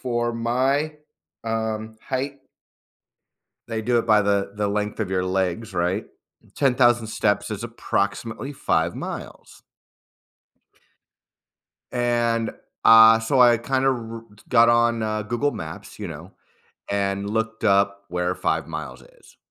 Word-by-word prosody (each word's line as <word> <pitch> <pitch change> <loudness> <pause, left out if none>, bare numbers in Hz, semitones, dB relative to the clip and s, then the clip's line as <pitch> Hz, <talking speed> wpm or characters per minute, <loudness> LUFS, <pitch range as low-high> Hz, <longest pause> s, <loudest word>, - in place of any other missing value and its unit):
for 120 -2 -1
my, 130 +6 0 0.5
um, 110 -1 -3
height 135 +2 -3 1.3
they 115 -1 -3
do 120 +2 +1
it 115 - 0
by 105 -2 +5
the 100 -1 0
the 105 -1 -1
length 105 +1 -2
of 105 - -2
your 95 -1 0
legs, 95 +3 -2
right? 90 +4 -1 0.5
10,000 120 -4 +3
steps 105 -1 0
is 105 +1 -5
approximately 115 +3 -3
5 85 -9 0
miles - - -8 2.3
and, 120 -2 0 0.3
uh, 115 0 +9
so 125 +4 +2
I 120 -1 +6
kind 130 +3 -1
of 135 - +5
r 115 -1 -7
r - - -10 0.3
got 115 -1 +6
on, 120 -1 +3
uh, 110 0 -2
Google 120 +7 -1
Maps, 80 0 -8
you - - -4
know, - - -9 0.6
and 100 0 -1
looked 110 +1 -2
up 100 -1 +2
where 90 +1 -1
5 - - -1
miles 75 -5 -7
is. - - -21
110 Hz, 130 wpm, -23 LUFS, 100-120 Hz, 2.3 s, uh